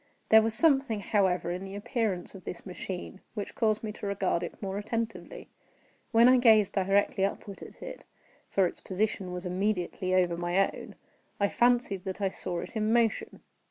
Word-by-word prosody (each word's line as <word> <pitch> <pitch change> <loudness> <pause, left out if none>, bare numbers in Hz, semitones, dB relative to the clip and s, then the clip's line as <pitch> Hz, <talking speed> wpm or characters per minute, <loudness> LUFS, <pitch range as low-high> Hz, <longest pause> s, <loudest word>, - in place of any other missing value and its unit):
There 220 0 +8
was 220 0 0
something, 270 -7 +3
however, 185 -4 +1
in 180 +2 -4
the 195 0 -7
appearance 215 -4 -2
of 190 -2 -11
this 175 - -7
machine 185 0 -6
which 205 - -5
caused 215 -1 +1
me 215 - -3
to 210 - -7
regard 195 -3 0
it 175 - -6
more 195 0 -3
attentively. 225 +2 -4 0.6
While 230 +1 +6
I 255 0 +7
gazed 220 -5 +5
directly 195 0 +2
upward 200 0 -3
at - - -11
it - - -8 0.5
(for 195 - +3
its 175 - -4
position 195 -1 -2
was 180 +1 -5
immediately 185 0 -1
over 180 -2 +3
my 175 +3 +1
own) - - -10 0.4
I 200 0 +2
fancied 240 -6 +2
that 190 +1 -4
I 195 -1 +1
saw 175 -2 -3
it 185 +7 -9
in 215 0 +1
motion. 235 - +1
200 Hz, 180 wpm, -29 LUFS, 185-220 Hz, 0.6 s, There